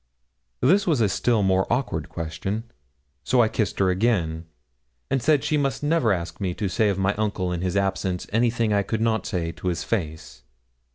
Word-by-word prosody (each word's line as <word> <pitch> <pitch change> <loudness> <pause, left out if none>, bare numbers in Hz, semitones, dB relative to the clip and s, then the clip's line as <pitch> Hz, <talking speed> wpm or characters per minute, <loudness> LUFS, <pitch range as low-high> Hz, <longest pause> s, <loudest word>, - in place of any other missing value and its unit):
This 190 +8 +4
was 155 -7 +2
a 110 - +4
still 110 +2 +1
more 95 0 +2
awkward 85 - -1
question; 85 +6 -4 0.6
so 125 - +2
I 115 - +6
kissed 110 -2 -1
her 95 -1 +3
again, 90 -6 0 0.7
and 135 -2 +1
said 145 +3 +3
she 155 - +1
must 140 0 -1
never 150 -6 +2
ask 85 -1 -3
me 90 -3 -1
to 105 - -2
say 110 +3 +2
of 100 - 0
my 95 +1 +1
uncle 100 -4 -1
in 85 -1 -2
his 90 +1 -1
absence 95 -2 -1
anything 115 -1 +2
I 100 - +3
could 110 +2 -3
not 110 -2 +1
say 85 -2 -2
to 90 - -7
his 85 -2 -1
face. 80 - -4
100 Hz, 190 wpm, -24 LUFS, 90-115 Hz, 0.7 s, I